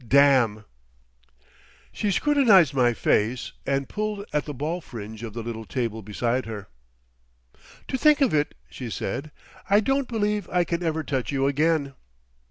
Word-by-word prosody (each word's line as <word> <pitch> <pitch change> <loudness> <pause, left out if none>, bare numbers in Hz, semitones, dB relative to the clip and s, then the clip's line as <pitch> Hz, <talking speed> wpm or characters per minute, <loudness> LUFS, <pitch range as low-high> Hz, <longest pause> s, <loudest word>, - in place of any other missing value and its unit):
Damn!" 130 -6 +4 1.3
She 210 - -2
scrutinised 205 - +4
my 125 -3 +3
face, 115 +4 +1 0.2
and 135 -1 0
pulled 210 -1 -3
at 150 - 0
the 150 - -5
ball 160 +7 -3
fringe 110 -6 -9
of 115 -3 -6
the 115 0 -5
little 115 -1 -5
table 110 +1 -3
beside 115 +4 -2
her. 105 -6 -7 1.2
"To 260 - -2
think 300 +1 +5
of 270 - +3
it," 150 -1 +1
she 125 -3 -7
said. 135 +8 -4 0.4
"I 200 +1 +6
don't 270 +4 0
believe 210 -3 -1
I 180 0 +3
can 170 +1 -2
ever 160 -2 -1
touch 135 -3 -2
you 135 -1 +1
again." 145 0 +1
140 Hz, 155 wpm, -25 LUFS, 120-195 Hz, 1.3 s, I